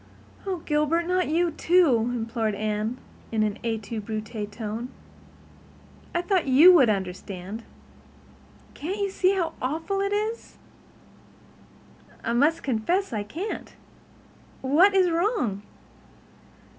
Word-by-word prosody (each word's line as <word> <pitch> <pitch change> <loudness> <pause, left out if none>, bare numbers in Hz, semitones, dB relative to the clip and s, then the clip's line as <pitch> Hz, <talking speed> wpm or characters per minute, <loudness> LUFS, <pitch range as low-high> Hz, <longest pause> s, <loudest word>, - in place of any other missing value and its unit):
"Oh, 375 -2 -1
Gilbert, 300 +3 +1
not 365 +1 +1
you," 335 +1 +1 0.5
implored 230 -2 -1
Anne, 215 +3 -2 0.3
in 220 -1 +1
an 210 0 -2
et 225 -2 -2
tu 215 +2 -5
Brute 215 0 -5
tone. 225 +3 -5 1.3
"I 345 - +1
thought 360 -4 +1
you 300 +8 +8
would 270 -10 +6
understand. 190 +1 -4 1.1
Can't 360 +7 -4
you 400 -1 -1
see 380 0 +2
how 335 -4 -1
awful 320 +9 -2
it 395 0 0
is?" 430 +3 -3 1.7
"I 230 - -1
must 295 +7 +2
confess 280 - 0
I 215 - -1
can't. 330 - -6 0.9
What 335 +10 +4
is 370 -2 +4
wrong?" 330 - 0
270 Hz, 115 wpm, -25 LUFS, 220-360 Hz, 1.7 s, you